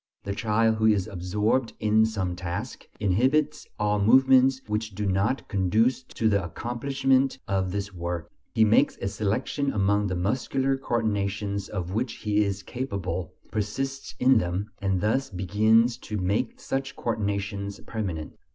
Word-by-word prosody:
The 100 - -3
child 110 +1 +2
who 110 0 +3
is 105 -4 +3
absorbed 105 +7 0
in 110 +1 +4
some 95 -5 -2
task, 95 +7 -5
inhibits 130 +10 +1
all 105 0 +1
movements 130 +4 +5
which 105 -1 -3
do 105 +1 -2
not 100 +7 0
conduce 110 +6 +2
to 115 -3 -2
the 100 -3 +2
accomplishment 130 - 0
of 95 -1 0
this 100 +1 -3
work; 85 -2 -4 0.3
he 110 - +5
makes 115 +7 +3
a 100 - -3
selection 110 +8 -1
among 100 -1 +2
the 95 - -2
muscular 130 +8 0
coordinations 100 -5 -1
of 90 -1 -4
which 110 +3 -1
he 105 -1 +1
is 100 -1 -3
capable, 95 -9 -4 0.2
persists 135 +6 -3
in 130 -2 +5
them, 90 +3 -3
and 95 -2 0
thus 130 +6 +1
begins 110 +6 +3
to 105 - -5
make 100 +5 -1
such 135 +1 -3
coordinations 100 -3 -2
permanent. 90 -9 -4
105 Hz, 145 wpm, -26 LUFS, 100-120 Hz, 0.3 s, movements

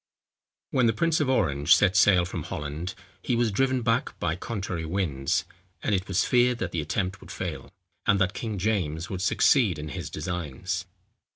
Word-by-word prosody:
When 125 -3 +3
the 115 - +3
prince 165 +8 +1
of 145 -4 +1
Orange 80 - +4
set 100 -1 +3
sail 90 -3 +5
from - - -4
Holland, 75 +5 -5 0.3
he 125 - 0
was 115 -2 +2
driven 130 +3 +1
back 115 +2 0
by 80 - 0
contrary 95 -4 -4
winds; 80 -6 -1 0.4
and 105 - +1
it 95 -1 0
was - - +1
feared 125 0 +3
that - - -3
the 85 - -1
attempt 95 +6 -2
would - - -13
fail, - - -5 0.4
and 100 - +4
that 95 -1 +2
King 110 -3 -4
James 90 -3 -1
would 95 -2 -3
succeed 100 - +3
in 75 +1 -6
his - - -5
designs. 90 +2 -4
95 Hz, 180 wpm, -27 LUFS, 85-115 Hz, 0.4 s, sail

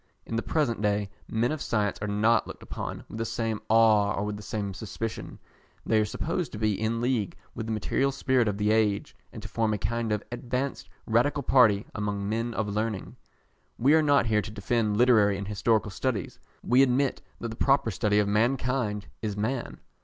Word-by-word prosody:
In 115 - -4
the 115 - +1
present 125 -9 0
day, 105 -1 0 0.2
men 115 +4 0
of 155 -2 -3
science 105 -3 0
are 105 - -2
not 110 +3 +2
looked - - -9
upon - - -6
with 110 - -8
the - - 0
same 115 -1 -2
awe 110 -2 +5
or 100 - -2
with 105 0 -3
the 105 - -8
same 105 -2 -4
suspicion. 110 +3 -5 0.5
They 110 - +3
are - - +1
supposed 165 - -3
to - - -5
be 110 -1 +1
in 110 +3 -1
league 120 -5 -1 0.2
with 110 - -5
the - - -2
material 130 +5 0
spirit 130 -3 +1
of 100 -1 -1
the 105 +1 +1
age, 105 -2 +1 0.2
and - - -9
to - - -6
form 110 -2 0
a - - -2
kind 115 +2 -2
of 105 -1 0
advanced 125 +3 -3 0.2
Radical 135 +6 +2
party 110 -6 +4
among 105 -1 -2
men 115 +2 -2
of 110 - -1
learning. 105 -1 -3 0.6
We 135 +5 +4
are 160 - +6
not 145 -4 +4
here 110 -2 +2
to 100 - -7
defend 105 0 0
literary 110 -5 +4
and 100 0 -5
historical 105 +1 +1
studies. 110 -1 -3 0.2
We 125 +2 +4
admit 135 +1 +2 0.2
that 115 - -4
the 110 - -6
proper 135 -2 +2
study 105 +1 +1
of 105 -1 +3
mankind 115 -1 0 0.2
is 105 -2 -3
man. 120 +4 -3
110 Hz, 200 wpm, -27 LUFS, 105-120 Hz, 0.6 s, are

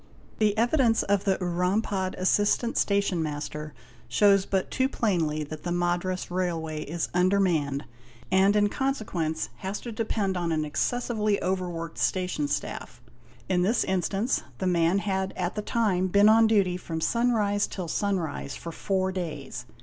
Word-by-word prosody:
| - - -26
'" - - -28
The 210 -1 +2
evidence 240 0 +3
of 200 0 +1
the 195 -2 +2
Urampad 185 +2 -1
assistant 205 +5 +1
station 200 -4 +1
master 150 0 -4 0.4
shows 200 -2 +4
but 190 -1 -1
too 260 0 +1
plainly 165 - 0
that 150 +1 -8
the 175 - -3
Madras 175 +1 -1
Railway 165 -4 -2
is 165 +2 -3
under 185 +3 +3
manned, 150 -7 0 0.5
and 195 +2 +4
in 205 0 +4
consequence 205 - -2
has 190 +9 -4
to 240 - -6
depend 215 -3 -1
on 170 -1 -1
an 155 -1 0
excessively 215 +4 0
over 185 0 -1
worked 165 -1 -6
station 180 -5 0
staff. 145 -3 -4 0.5
In 180 -2 +2
this 215 +7 +2
instance, 195 +5 0 0.2
the 190 - -3
man... 175 0 +3
had 190 -1 -1
at 180 0 -1
the 210 - -3
time 205 -4 +1
been 200 +3 +5
on 225 +1 +6
duty 195 -5 +2
from 165 -2 -5
sunrise 215 -1 +1
till 185 -3 -5
sunrise 170 -7 -2
for 170 - -7
four 190 +2 -1
days. 150 -9 -5
185 Hz, 160 wpm, -27 LUFS, 170-205 Hz, 0.5 s, on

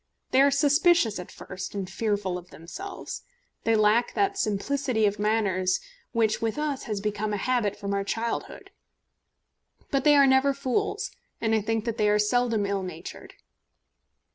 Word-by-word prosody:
They 260 - +5
are 280 - +6
suspicious 290 - +3
at 180 - -8
first, 190 +1 -8
and 195 -2 -3
fearful 200 -1 -1
of 180 0 -8
themselves. 265 - -8 0.4
They 225 - +4
lack 215 +3 +3
that 395 0 +1
simplicity 255 - 0
of 205 0 0
manners 200 -4 +1 0.3
which 220 -1 +1
with 225 +2 -1
us 300 -3 -2
has 210 -3 -2
become 210 +1 -2
a - - 0
habit 235 -2 0
from 200 0 -3
our 200 0 0
childhood. 230 +3 -4 1.2
But 275 -2 +1
they 295 0 +6
are 280 -1 +7
never 270 +1 +4
fools, 275 +9 -1 0.3
and 225 -1 0
I 220 - +3
think 225 +1 -1
that 230 -1 -3
they 210 -1 +3
are 210 - +4
seldom 225 0 +1
ill 200 -1 -1
natured. 180 -3 -8
220 Hz, 165 wpm, -26 LUFS, 205-265 Hz, 1.2 s, are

